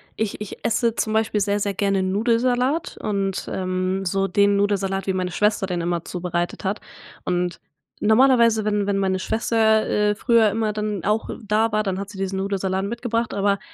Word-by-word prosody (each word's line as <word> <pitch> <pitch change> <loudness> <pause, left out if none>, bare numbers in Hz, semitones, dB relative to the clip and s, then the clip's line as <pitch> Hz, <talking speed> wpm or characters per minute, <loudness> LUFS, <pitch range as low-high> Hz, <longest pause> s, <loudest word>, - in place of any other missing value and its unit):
ich 220 -2 -2
ich 210 -2 -8
esse 230 0 +1
zum 220 - -1
Beispiel 220 -1 +1
sehr, 200 +1 +1
sehr 200 0 -1
gerne 195 0 +1
Nudelsalat 245 - +1
und, 195 -2 -2
ähm, 185 +1 -2
so 195 +2 0
den 200 +2 +3
Nudelsalat, 195 -1 0
wie 190 - +1
meine 185 -1 -2
Schwester 210 +1 +1
den 175 -2 -2
immer 170 0 -2
zubereitet 175 -1 -3
hat 195 +2 -1 0.5
und 180 -1 -1 0.4
normalerweise 230 0 +4
wenn 205 -1 0
wenn 200 -1 +1
meine 190 -1 0
Schwester, 220 +1 +2
äh, 210 0 +1
früher 230 -1 +3
immer 215 +1 -1
dann 210 -3 -3
auch 215 +2 0
da 215 +2 +1
war, 215 0 +2
dann 190 -2 -2
hat 200 0 -5
sie 205 - -11
diesen 190 0 -2
Nudelsalat 195 -1 -1
mitgebracht, 235 +1 -2
aber 200 0 +1
205 Hz, 180 wpm, -22 LUFS, 190-220 Hz, 0.5 s, normalerweise